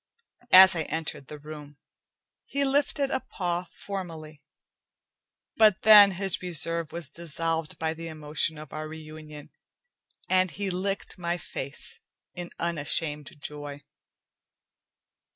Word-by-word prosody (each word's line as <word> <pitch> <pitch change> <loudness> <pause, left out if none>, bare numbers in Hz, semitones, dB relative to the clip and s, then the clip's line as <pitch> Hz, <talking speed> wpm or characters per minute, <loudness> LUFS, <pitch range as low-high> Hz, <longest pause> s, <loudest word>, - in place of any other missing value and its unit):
As 190 0 +9
I 165 - 0
entered 155 -3 -4
the 150 - -8
room, 150 -1 -10 0.7
he 280 0 0
lifted 275 0 +1
a - - +1
paw 175 -6 -3 0.2
formally, 165 -6 -6 1.2
but 215 -3 +5
then 205 -2 +9
his 190 0 -1
reserve 165 -2 0
was 170 -3 -5
dissolved 165 +2 -3
by 160 0 -1
the 165 +1 -7
emotion 155 0 -1
of 155 -1 -10
our 155 0 -5
reunion, 155 -1 -10 0.8
and 185 0 +3
he 200 +2 -3
licked 195 +1 -3
my 175 0 -1
face 140 -4 -3 0.3
in 175 -1 -6
unashamed 150 -2 -1
joy. 145 0 -7
165 Hz, 115 wpm, -27 LUFS, 155-185 Hz, 1.2 s, As